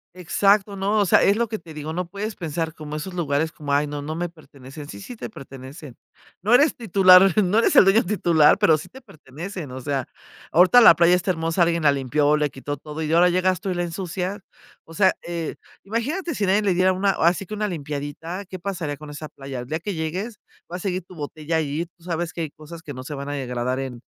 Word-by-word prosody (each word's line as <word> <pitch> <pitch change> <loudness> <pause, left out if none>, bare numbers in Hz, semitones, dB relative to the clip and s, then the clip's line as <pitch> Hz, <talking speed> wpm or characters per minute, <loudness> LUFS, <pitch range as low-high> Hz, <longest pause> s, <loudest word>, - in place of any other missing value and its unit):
Exacto, 200 +3 +2
¿no?, 200 +2 0
o 200 - +3
sea, - - +5
es 200 - +4
lo 235 0 0
que 220 0 -5
te 165 -2 -13
digo, 155 +1 -6
no 180 0 -3
puedes 205 +3 -5
pensar 165 -1 -3
como 150 -1 -8
esos 180 +5 -5
lugares 160 -2 -1
como: 145 -2 -4
"Ay 145 +1 +2
no, 145 0 -5
no 155 +2 -5
me 175 +1 -3
pertenecen", 145 -2 -12
sí, - - -9
sí 245 +5 -9
te - - -7
pertenecen. 135 - -11 0.5
No 210 +6 +1
eres 285 +5 +5
titular, 190 -4 +6
no 200 +5 +2
eres - - +2
el - - +9
dueño 195 +4 +4
titular, 170 -6 +3
pero 160 - +4
sí - - -9
te 265 - -13
pertenecen, 160 - -9
o 130 0 -7
sea, 135 -2 -2 0.4
ahorita 185 +9 +6
la 170 - +9
playa 170 +2 +4
está 180 +1 +1
hermosa, 165 +1 -1
alguien 170 -1 0
la 145 - +6
limpió, 145 +2 +1
le 150 -1 0
quitó 145 +2 -6
todo 150 +2 -8
y 155 0 -2
ahora 175 +2 +5
llegaste 185 +1 0
y - - 0
la 175 0 -1
ensucia, 180 +3 -4 0.5
o 165 - -13
sea, 190 +1 +4
eh, 170 -2 -4 0.3
imagínate 290 - -2
si 205 -5 -1
nadie 195 +3 +3
le 195 -3 +1
diera 185 +1 +3
una 195 +1 +1
así 180 +3 +1
que 215 - -8
una 210 0 -1
limpiadita, 155 +3 -5
¿qué 185 0 -8
pasaría 170 -6 -4
con 150 -1 -11
esa 150 +1 -7
playa?, 135 -2 -8
el 125 - -7
día 155 +4 -2
que 200 +4 -4
llegues, 185 +8 -4 0.3
va 180 - -3
a - - -9
seguir 185 -1 -3
tu 180 - -15
botella 155 +1 -3
ahí, 155 +2 -2
tú 170 - -24
sabes 170 -1 -2
que 170 - -5
hay 160 - -3
cosas 160 +3 -12
que 145 -3 -8
no 130 - -8
se 150 - -7
van 140 0 -6
a 145 - -3
degradar 125 -1 -2
en 130 -3 -6
170 Hz, 240 wpm, -23 LUFS, 150-190 Hz, 0.5 s, el